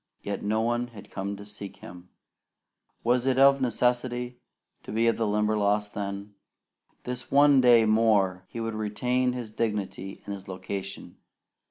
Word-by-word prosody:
Yet 100 0 -3
no 110 +2 0
one 120 +1 0
had 110 -4 -13
come 100 +1 -4
to 100 - -10
seek 105 -1 -9
him. 90 +1 -12 0.9
Was 125 +2 +2
it 130 -1 +2
of 140 0 +6
necessity 125 0 0 0.4
to - - -9
be 115 +2 +2
the 115 -1 -1
Limberlost 105 0 +1
then? 100 0 -5 0.7
This 125 0 -5
one 140 -1 +6
day 120 -3 +6
more 105 -4 +3
he 115 - -7
would 115 0 -3
retain 125 +4 0
his 120 -3 -6
dignity 105 -3 -3
and 100 - -4
his 100 -1 -9
location. 95 +1 -6
110 Hz, 150 wpm, -27 LUFS, 100-120 Hz, 0.9 s, of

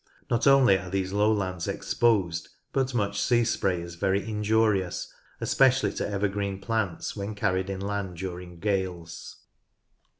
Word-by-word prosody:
Not 120 +3 +2
only 135 -8 +6
are 90 -1 -8
these 95 0 -2
lowlands 100 -4 +1
exposed, 95 -8 +1 0.2
but 135 -2 0
much 100 -2 0
sea 120 -1 +3
spray 95 -6 0
is 85 0 -8
very 95 +4 0
injurious, 105 -3 +1 0.3
especially 130 -6 +3
to - - -3
evergreen 100 -1 -1
plants 105 -3 -2
when 100 +1 -4
carried 95 -2 0
inland 100 -1 -3
during 90 -1 -6
gales. 95 -4 -3
100 Hz, 130 wpm, -27 LUFS, 95-110 Hz, 0.3 s, only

